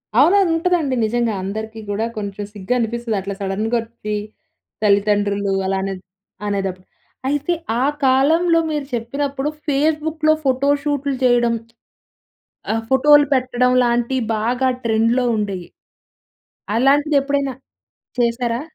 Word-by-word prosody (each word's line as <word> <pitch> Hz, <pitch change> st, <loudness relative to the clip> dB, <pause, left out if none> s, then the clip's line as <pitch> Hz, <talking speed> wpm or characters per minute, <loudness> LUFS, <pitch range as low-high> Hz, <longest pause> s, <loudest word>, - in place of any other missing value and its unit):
అవునవును. 345 Hz, -, +5 dB
ఉంటదండి 330 Hz, -5 st, +1 dB
నిజంగా 235 Hz, 0 st, 0 dB
అందరికి 220 Hz, +3 st, -5 dB
కూడా 205 Hz, +2 st, -1 dB
కొంచెం 205 Hz, -1 st, -4 dB
సిగ్గు 205 Hz, +3 st, -3 dB
అనిపిస్తది 235 Hz, -1 st, -2 dB
అట్లా 195 Hz, +1 st, -5 dB
సడెన్‌గా 210 Hz, +5 st, -1 dB
వచ్చి, 225 Hz, -2 st, -7 dB, 0.7 s
తల్లిదండ్రులు 205 Hz, -1 st, +2 dB
అలా 190 Hz, 0 st, 0 dB
అనే 195 Hz, 0 st, -2 dB, 0.5 s
అనేటప్పుడు. 195 Hz, -2 st, -3 dB, 0.4 s
అయితే 290 Hz, +4 st, 0 dB, 0.3 s
ఆ -, -, +3 dB, 0.2 s
కాలంలో 320 Hz, +6 st, +4 dB
మీరు 295 Hz, -2 st, -2 dB
చెప్పినప్పుడు 275 Hz, +4 st, -2 dB, 0.2 s
ఫేస్‌‌‌‌బుక్‌లో 310 Hz, +2 st, +1 dB
ఫోటో‌షూట్‌లు 280 Hz, +1 st, +1 dB
చేయడం. 240 Hz, -1 st, +3 dB, 1.2 s
ఆ! -, -, +2 dB, 0.2 s
ఫోటో‌లు 290 Hz, +2 st, +6 dB
పెట్టడం 250 Hz, -1 st, +1 dB
లాంటియి 240 Hz, +2 st, 0 dB
బాగా 245 Hz, +4 st, 0 dB, 0.2 s
ట్రెండ్‌లో 230 Hz, +2 st, +2 dB
ఉండేయి. 195 Hz, -4 st, -3 dB, 1.1 s
అలాంటిది 285 Hz, +4 st, +3 dB
ఎప్పుడైనా 280 Hz, -1 st, -1 dB, 0.6 s
చేసారా? 235 Hz, 0 st, 0 dB
245 Hz, 105 wpm, -20 LUFS, 215-285 Hz, 1.2 s, ఫోటో‌లు